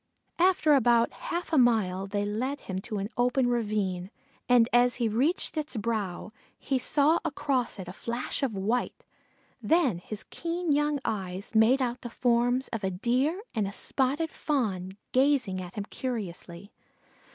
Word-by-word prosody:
After 355 -4 +4
about 240 -3 +4
half 345 0 -5
a 305 - +5
mile 200 -6 +2
they 205 +1 -1
led 250 +8 -2
him 190 -1 -4
to 210 +2 -5
an 200 0 -2
open 250 +1 +2
ravine, 205 -6 -1 0.4
and 240 -2 +6
as 245 0 +4
he 240 -2 0
reached 265 - 0
its 300 -5 -3
brow 210 -3 -3 0.3
he 270 -2 -1
saw 295 +5 +3
across 275 -7 -1
it 190 -3 -7
a 180 - -7
flash 235 +7 -3
of 255 -6 -1
white; 220 +6 -1 0.6
then 310 - +2
his 210 +4 -8
keen 340 0 -2
young 295 0 +2
eyes 190 0 -4
made 230 +5 +5
out 245 0 -3
the 240 - -6
forms 245 +2 +1
of 225 -3 -4
a 190 - +1
Deer 255 - 0
and 215 -4 0
a - - -5
spotted 280 +9 -1
Fawn 195 - -2
gazing 255 -8 +2
at 180 0 -9
him 205 -2 -3
curiously. 200 -6 -6
240 Hz, 160 wpm, -28 LUFS, 200-275 Hz, 0.6 s, and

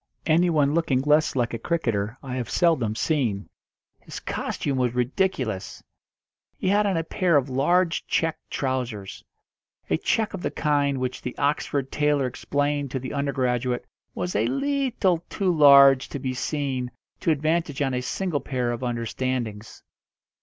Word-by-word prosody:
Anyone 155 -3 +3
looking 150 -6 +1
less 150 +2 +3
like 120 -2 0
a 115 - -3
cricketer 115 - -1
I 130 -2 -6
have 125 - -4
seldom 140 -12 +2
seen. 115 -9 0 0.5
His - - -8
costume 135 -2 -3
was 125 -1 0
ridiculous. 125 - -1 0.7
He 185 - -1
had 205 +1 +3
on 190 -4 +1
a 165 - 0
pair 170 0 +2
of 135 -1 -1
large 165 +6 +1
check 165 -1 0
trousers 125 -7 -3 0.7
a 80 - +3
check 220 - 0
of 195 - -5
the - - -1
kind 145 -2 +1
which 130 0 -3
the 125 - -6
Oxford 140 -1 -1
tailor 150 -2 +1
explained 145 +2 -1
to 130 - -3
the 130 0 -6
undergraduate 130 -3 -1 0.3
was 90 -1 -3
a 110 +3 +2
leetle 235 - 0
too 185 -3 0
large 140 -3 +7
to - - -4
be 130 -1 -3
seen 130 -2 -2 0.3
to - - -1
advantage 155 0 0
on 135 -3 0
a 125 - -1
single 165 +3 -2
pair 125 -3 -2
of 120 0 -4
understandings. 120 -2 -3
140 Hz, 155 wpm, -25 LUFS, 125-160 Hz, 0.7 s, large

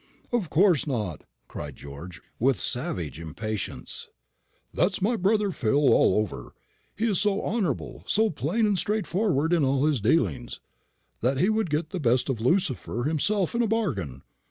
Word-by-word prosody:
"Of 230 -9 0
course 175 -3 +3
not," 105 - -3 0.2
cried 75 -2 -7
George, 70 +6 -10 0.2
with 130 -3 +2
savage 80 -3 -3
impatience; 105 +5 -5 0.7
"that's - - +1
my 220 +5 +1
brother 205 0 +2
Phil 140 0 +3
all - - +4
over. 100 - -3 0.4
He 225 +4 0
is 200 -6 +1
so 205 -1 +2
honourable, 190 - -2
so 220 0 +2
plain 225 0 0
and 205 -3 +2
straightforward 195 -6 0
in 165 -4 +3
all 135 +1 +2
his 150 -7 +1
dealings, 110 - 0 0.6
that 130 +3 +1
he 185 +8 +3
would 220 -4 +1
get 150 +2 -1
the 185 - -3
best 125 -1 +2
of 120 -5 -2
Lucifer 130 - 0
himself 165 +6 +1
in 235 - +1
a 235 - +2
bargain. 110 - -2
150 Hz, 155 wpm, -26 LUFS, -, 0.7 s, all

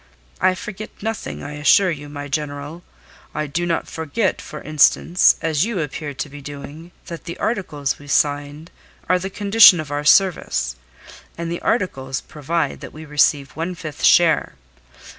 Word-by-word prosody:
"I 185 0 +3
forget 210 +3 -7
nothing, 225 0 -4
I 145 - -6
assure 155 +6 +4
you, 145 -2 -7
my 145 0 -7
General. 145 +3 -4 0.5
I 150 0 -1
do 170 +5 -2
not 165 -1 -1
forget, 160 +6 -2
for 150 - -8
instance, 155 +3 +4
as 160 -1 +1
you 220 -3 -2
appear 145 -1 -4
to 145 - -4
be 145 0 -11
doing, 145 +4 -9 0.2
that 170 -1 -8
the 170 - -6
articles 150 - -2
we 145 - -13
signed 145 +2 0 0.4
are 185 0 +3
the 190 +2 -4
condition 200 -2 +6
of 155 -2 -6
our 145 0 -2
service; 150 - +3 0.6
and 170 0 -4
the 170 - -4
articles 135 - -1
provide 155 +3 -3
that - - -10
we 155 +1 -10
receive 145 -2 +2
one 170 +4 -4
fifth 155 -4 -8
share. 165 - +4
155 Hz, 160 wpm, -21 LUFS, 145-175 Hz, 0.6 s, condition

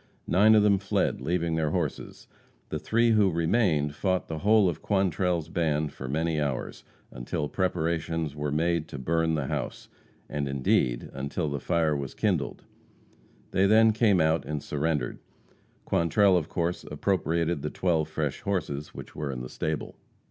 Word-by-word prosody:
Nine 105 +4 +5
of 105 - +5
them 100 -2 +4
fled, 100 - 0
leaving 85 -1 0
their 80 -1 +1
horses. 80 -3 -4 0.4
The 75 - -3
three 115 +7 +2
men - - +4
who 100 -2 +5
remained 85 -3 +1
fought 95 +3 -1
the 80 -1 -3
whole 105 +1 +4
of 85 -3 -2
Quantrell's 90 -4 0
band 75 -3 -1
for 65 - -7
many 80 +3 0
hours, 70 -4 -3 0.3
until 65 +4 -3
preparations 80 -3 -1
were 75 -1 -2
made 80 +1 0
to - - -7
burn 80 +4 0
the 75 -3 -1
house, - - -4 0.4
and, 70 -1 -3
indeed, 65 -3 0
until 70 +4 -3
the 70 0 -3
fire 80 +1 +1
was 70 -2 -5
kindled. - - -1 0.9
They 95 +1 +3
then 110 +2 +6
came 105 -4 +3
out 80 0 +2
and 75 -1 -4
surrendered. 75 +1 -2 0.7
Quantrell, 95 +4 +3
of 80 -4 0
course, 85 0 -2
appropriated 85 -1 -1
the - - -2
twelve 80 -4 0
fresh 80 -3 -3
horses 75 -7 -3
which - - -10
were 75 -1 -3
in 65 -2 -5
the 60 - -7
stable. 80 -1 -3
80 Hz, 165 wpm, -27 LUFS, 75-90 Hz, 0.9 s, then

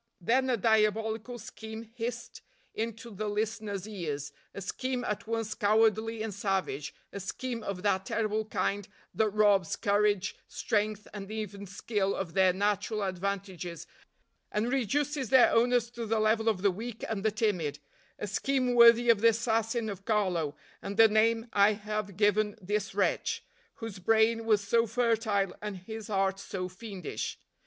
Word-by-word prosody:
Then 255 +8 +2
a 245 - +2
diabolical 220 +2 +1
scheme 220 0 -8
hissed 240 0 -5 0.3
into 230 +2 -4
the 210 +2 -3
listeners' 210 -1 -2
ears 150 -9 -4 0.2
a - - -7
scheme 250 +6 -3
at 210 -2 -3
once 225 -1 -2
cowardly 220 +1 +2
and 220 -2 -4
savage 190 -8 -2 0.2
a 200 - -4
scheme 235 +5 -4
of 200 -3 -5
that 190 -2 +1
terrible 215 -1 0
kind 205 -1 -1 0.3
that 220 -1 +2
robs 205 -4 +3
courage, 205 -1 +1
strength 210 0 -1
and 200 -1 -7
even 205 -2 -5
skill 200 0 -1
of 175 -4 -4
their 190 0 +5
natural 205 +2 0
advantages, 185 -3 -4 0.7
and 220 +4 0
reduces 275 +1 0
their 260 -2 +6
owners 240 0 +3
to 235 -1 -5
the 225 +1 +1
level 220 +1 +3
of 195 -4 -1
the 200 - +5
weak 225 +4 -7
and 210 -3 -3
the 220 - +4
timid 200 -9 -1 0.4
a - - -4
scheme 255 +5 0
worthy 235 0 +7
of 215 -3 +1
the 230 - +6
assassin 225 0 0
of 200 -2 -6
Carlo, 180 -9 0 0.3
and 200 +1 -5
the 225 0 +9
name 225 +1 +3
I 205 +1 +5
have 210 -2 -4
given 210 0 +2
this 200 0 -2
wretch, 200 - 0 0.3
whose 225 -4 -7
brain 225 +3 +3
was 210 -3 +2
so 230 +2 +3
fertile 220 -4 +1
and 210 -2 -4
his 220 +4 -8
heart 195 -1 0
so 185 -2 -4
fiendish. 190 -1 -6
215 Hz, 155 wpm, -30 LUFS, 200-225 Hz, 0.7 s, the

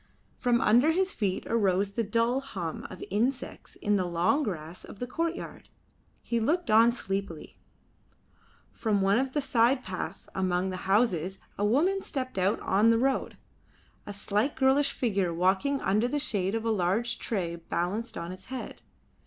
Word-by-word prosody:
From 240 -1 +2
under 245 +9 +4
his 380 +2 +1
feet 195 -4 -1
arose 200 -3 +1
the 230 +3 -1
dull 230 +4 +1
hum 190 - -5
of 185 - -9
insects 245 +6 -2
in 205 0 +1
the 185 - 0
long 175 - +1
grass 175 - -5
of - - -11
the 245 - -3
courtyard. 330 +7 -4 0.5
He 235 - -1
looked 300 +3 0
on 225 +2 +6
sleepily. 195 -7 -5 1.1
From 210 -3 0
one 200 +4 +3
of 260 0 -2
the 295 - +1
side 255 0 +2
paths 185 -1 -6
amongst 185 0 0
the 185 - -6
houses 195 -4 +2 0.2
a 205 - -2
woman 325 - +2
stepped 255 - -3
out 190 +3 +2
on 205 +4 +3
the 230 - +4
road, 265 +3 0 0.7
a - - -4
slight 205 +6 -1
girlish 275 +1 +3
figure 200 -7 0
walking 190 +11 +1
under 210 +5 +2
the 295 - -1
shade 205 -8 0
of 225 0 -3
a 225 - +2
large 220 +4 0
tray 175 -6 -2
balanced 180 +7 -3
on 170 +1 -5
its 185 - -10
head. 260 -1 -7
215 Hz, 165 wpm, -28 LUFS, 190-255 Hz, 1.1 s, on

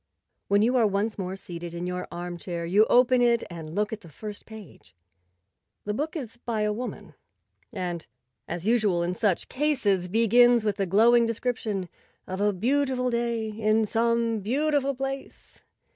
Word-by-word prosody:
When 200 +1 +3
you 245 +3 +2
are 230 -3 +4
once 205 +2 -1
more 185 0 -3
seated 170 -2 -8
in 175 +1 -4
your 180 0 -4
armchair, 175 0 -5
you 200 +6 +4
open 250 0 +5
it 235 -1 +3
and 160 -1 -8
look 210 +1 0
at 220 - -6
the 170 - -13
first 210 +6 -9
page. 220 - -13 0.9
The 210 - -1
book 300 +9 -3
is 240 -8 -6
by 235 -2 -3
a 210 0 +1
woman, 245 +4 -6 0.6
and, 180 -6 -4 0.4
as 175 +1 -5
usual 210 -6 +2
in 175 +1 -1
such 195 -2 0
cases, 245 -11 0
begins 230 +3 +4
with 210 -1 -1
a 195 - 0
glowing 230 +5 +5
description 225 -5 -2 0.4
of 185 +1 -5
a 205 0 +3
beautiful 250 +4 0
day 235 -2 -1
in 215 +1 +1
some 230 0 +1
beautiful 275 +5 0
place. 270 +1 -6
215 Hz, 160 wpm, -26 LUFS, 190-240 Hz, 0.9 s, open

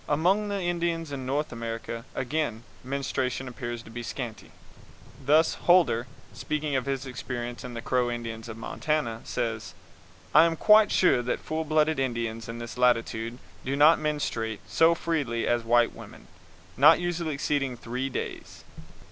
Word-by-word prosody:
Among 185 +8 +2
the 200 -1 -1
Indians 170 -3 -1
in 130 -2 -5
North 145 +3 -1
America, 115 0 -5
again, 135 -3 -2 0.2
menstruation 130 -1 -2
appears 120 -1 -5
to 115 - -13
be 120 +1 -6
scanty. 120 -1 -6 0.7
Thus, 155 +3 +4
Holder, 170 -9 +3 0.3
speaking 150 -2 -2
of 130 0 -1
his 135 -1 -2
experience 120 -1 -5
with 125 -1 -7
the 115 - -6
Crow 125 -1 +1
Indians 115 -1 -5
of 110 - -7
Montana, 115 0 -2
says: 110 -7 -3 0.6
"I 155 +2 +8
am 165 -1 +1
quite 215 +4 +6
sure 180 -9 +4
that 120 - -1
full 160 0 -3
blood 155 0 +3
Indians 115 -3 -2
in 115 - -5
this 120 +1 -7
latitude 115 -1 +1 0.3
do 135 +1 -2
not 150 +3 +6
menstruate 115 -8 -2
so 165 +1 +4
freely 145 -9 -1
as 120 -1 +1
white 120 +1 +3
women, - - -12 0.5
not - - +7
usually 175 -3 -2
exceeding 140 -3 -1
three 125 +4 -3
days." - - -6
130 Hz, 155 wpm, -27 LUFS, 115-155 Hz, 0.7 s, I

